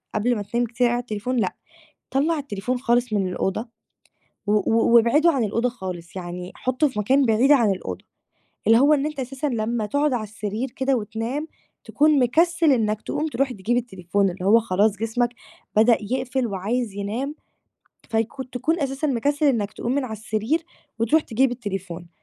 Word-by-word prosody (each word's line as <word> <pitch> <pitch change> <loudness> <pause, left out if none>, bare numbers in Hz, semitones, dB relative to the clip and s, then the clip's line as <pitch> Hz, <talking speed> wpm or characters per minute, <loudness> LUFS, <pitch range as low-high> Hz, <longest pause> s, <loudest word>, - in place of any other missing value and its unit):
قبل 235 +3 +1
ما 210 - -3
تنام 235 +4 -1
كتير 240 +2 0
أوي 240 - +1
على 240 - 0
التليفون 245 +2 -3
لأ، 200 -6 0 0.6
طلّع 300 +4 +1
التليفون 245 -2 -3
خالص 240 -1 +1
من 195 -3 +1
الأوضة 190 +5 -2 0.8
و - - +2
و 225 +3 +3
وابعدُه 285 +9 +5
عن 270 -6 0
الأوضة 230 +4 0
خالص، 185 -7 -7
يعني 180 0 -6
حُطّه 255 +4 +1
في 210 - -5
مكان 265 +7 +3
بعيد 235 +5 +3
عن 235 -8 +5
الأوضة، 95 - -5 0.6
اللي 225 +1 +6
هو 285 +3 +5
إن 285 -1 +1
أنت 300 -2 -4
أساسًا 270 +3 -3
لمّا 230 -3 -1
تقعد 285 +5 +1
عالسرير 215 +2 -3
كده 265 0 +1
وتنام، 230 +7 -3 0.4
تكون 300 0 +3
مكسّل 330 +5 +3
إنّك 215 -3 0
تقوم 295 +2 -2
ترُوح 275 -2 -1
تجيب 235 +2 -1
التليفون، 195 -4 0
اللي 180 +1 -7
هو 215 +4 +6
خلاص 210 -1 +1
جسمك 225 +3 0 0.5
بدأ 225 +2 +6
يقفل 255 +3 -1
وعايز 210 +3 -2
ينام 225 +9 -3 0.8
فيكو 225 +4 -1
تكون 260 +7 -2
أساسًا 275 +1 -1
مكسّل 285 +4 +1
إنّك 220 -7 +1
تقوم 235 - -3
من 285 -1 0
على 235 - -6
السرير 220 +9 -1 0.3
وترُوح 235 +8 +3
تجيب 260 +1 +1
التليفون، 195 -7 -6
235 Hz, 170 wpm, -23 LUFS, 210-265 Hz, 0.8 s, اللي